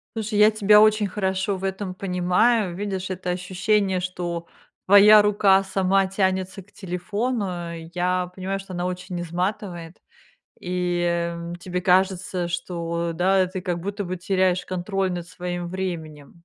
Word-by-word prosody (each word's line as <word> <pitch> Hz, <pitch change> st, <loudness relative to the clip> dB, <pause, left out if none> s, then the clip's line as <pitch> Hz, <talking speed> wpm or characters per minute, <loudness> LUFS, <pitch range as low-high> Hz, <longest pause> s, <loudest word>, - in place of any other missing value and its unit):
Слушай, 215 Hz, -1 st, -2 dB
я 210 Hz, -, +8 dB
тебя 210 Hz, 0 st, +5 dB
очень 215 Hz, -1 st, +4 dB
хорошо 190 Hz, 0 st, -1 dB
в 185 Hz, -, -10 dB
этом 190 Hz, -1 st, -3 dB
понимаю. 185 Hz, +2 st, +1 dB
Видишь, 190 Hz, -1 st, -4 dB
это 180 Hz, -1 st, -4 dB
ощущение, 185 Hz, +2 st, 0 dB
что 175 Hz, -2 st, -4 dB, 0.4 s
твоя 205 Hz, +2 st, +8 dB
рука 200 Hz, -2 st, +4 dB
сама 190 Hz, 0 st, +1 dB
тянется 190 Hz, 0 st, -1 dB
к 200 Hz, -, -27 dB
телефону, 190 Hz, -1 st, -3 dB, 0.2 s
я 180 Hz, 0 st, -1 dB
понимаю, 190 Hz, +1 st, -3 dB
что 195 Hz, -1 st, -10 dB
оно 175 Hz, +1 st, -2 dB
очень 180 Hz, -1 st, -5 dB
изматывает, 175 Hz, -1 st, -4 dB, 0.6 s
и 175 Hz, -1 st, -1 dB, 0.2 s
тебе 180 Hz, +1 st, -4 dB
кажется, 185 Hz, -1 st, +1 dB
что 170 Hz, -1 st, -3 dB
да, 185 Hz, +2 st, +3 dB
ты 185 Hz, 0 st, -5 dB
как 175 Hz, -1 st, -3 dB
будто 200 Hz, +2 st, -4 dB
бы 185 Hz, +1 st, -4 dB
теряешь 185 Hz, 0 st, +1 dB
контроль 190 Hz, +1 st, -2 dB
над 175 Hz, -1 st, -5 dB
своим 175 Hz, 0 st, -5 dB
временем. 170 Hz, -4 st, -6 dB
185 Hz, 140 wpm, -23 LUFS, 175-195 Hz, 0.6 s, я